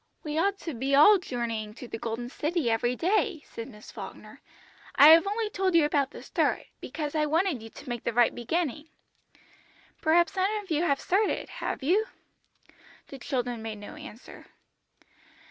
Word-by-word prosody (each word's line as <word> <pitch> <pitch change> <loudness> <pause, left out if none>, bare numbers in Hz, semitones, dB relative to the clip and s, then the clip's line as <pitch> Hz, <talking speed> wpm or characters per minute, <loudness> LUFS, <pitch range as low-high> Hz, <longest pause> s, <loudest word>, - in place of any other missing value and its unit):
"We 300 -1 -4
ought 395 +3 +1
to 325 - -5
be 265 +3 0
all 385 +8 +7
journeying 230 -8 -4
to 250 - -9
the 225 - -6
Golden 230 +2 -4
City 300 -1 -1
every 240 +2 +1
day," 365 - 0
said 230 - -8
Miss 210 -3 -13
Falkner. - - -10 0.5
"I 290 +2 +9
have 330 +4 +7
only 430 +2 -1
told 380 -3 0
you 325 -3 +6
about 285 -2 +1
the - - -11
start, - - 0
because 295 -2 -5
I 305 -1 +1
wanted 325 - +1
you 225 - -10
to - - -13
make 240 -2 -4
the - - -1
right 240 +1 +3
beginning. 300 +4 -2 1.1
Perhaps 340 +1 +3
some 380 +1 +1
of 380 - -13
you 310 0 +2
have 280 -5 +1
started, 400 +3 0
have - - -4
you?" 395 - +2 1.0
The 275 - -9
children 245 -3 -3
made 220 -1 -5
no 205 +6 -10
answer. 300 -6 -12
295 Hz, 175 wpm, -28 LUFS, 240-345 Hz, 1.1 s, I